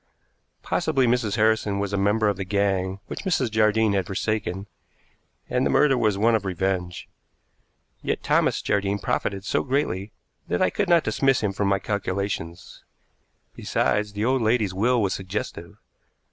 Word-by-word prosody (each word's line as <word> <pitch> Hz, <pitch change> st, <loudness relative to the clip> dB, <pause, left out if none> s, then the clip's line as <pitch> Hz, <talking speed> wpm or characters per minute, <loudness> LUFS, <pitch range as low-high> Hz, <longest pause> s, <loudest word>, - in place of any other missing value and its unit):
Possibly 135 Hz, -5 st, +1 dB
Mrs. 115 Hz, -3 st, +1 dB
Harrison 110 Hz, -2 st, +2 dB
was 100 Hz, 0 st, -2 dB
a -, -, +2 dB
member 105 Hz, +2 st, +2 dB
of 100 Hz, -, +1 dB
the 95 Hz, -, -4 dB
gang 95 Hz, -1 st, 0 dB
which -, -, -6 dB
Mrs. 150 Hz, -, 0 dB
Jardine 110 Hz, -1 st, +3 dB
had 95 Hz, -3 st, 0 dB
forsaken, 100 Hz, -1 st, -2 dB, 0.8 s
and -, -, 0 dB
the -, -, +1 dB
murder 145 Hz, -3 st, +4 dB
was 110 Hz, -5 st, +1 dB
one 115 Hz, +3 st, +3 dB
of 110 Hz, -3 st, +1 dB
revenge; 95 Hz, -1 st, -2 dB, 0.9 s
yet -, -, -2 dB
Thomas -, -, +1 dB
Jardine 100 Hz, 0 st, 0 dB
profited 100 Hz, -1 st, -2 dB
so -, -, +1 dB
greatly 120 Hz, -8 st, -1 dB, 0.4 s
that 90 Hz, -, -1 dB
I -, -, +2 dB
could 200 Hz, -3 st, -1 dB
not 170 Hz, -2 st, +5 dB
dismiss 135 Hz, -1 st, +1 dB
him 105 Hz, -3 st, -1 dB
from 100 Hz, +1 st, -1 dB
my 100 Hz, 0 st, +3 dB
calculations. 95 Hz, -4 st, -4 dB, 0.7 s
Besides, 105 Hz, -1 st, 0 dB
the 105 Hz, +2 st, -2 dB
old 130 Hz, +1 st, +2 dB
lady's 110 Hz, -3 st, +1 dB
will 120 Hz, +6 st, +2 dB
was 100 Hz, -4 st, +1 dB
suggestive. 95 Hz, +2 st, -5 dB
105 Hz, 160 wpm, -24 LUFS, 95-110 Hz, 0.9 s, not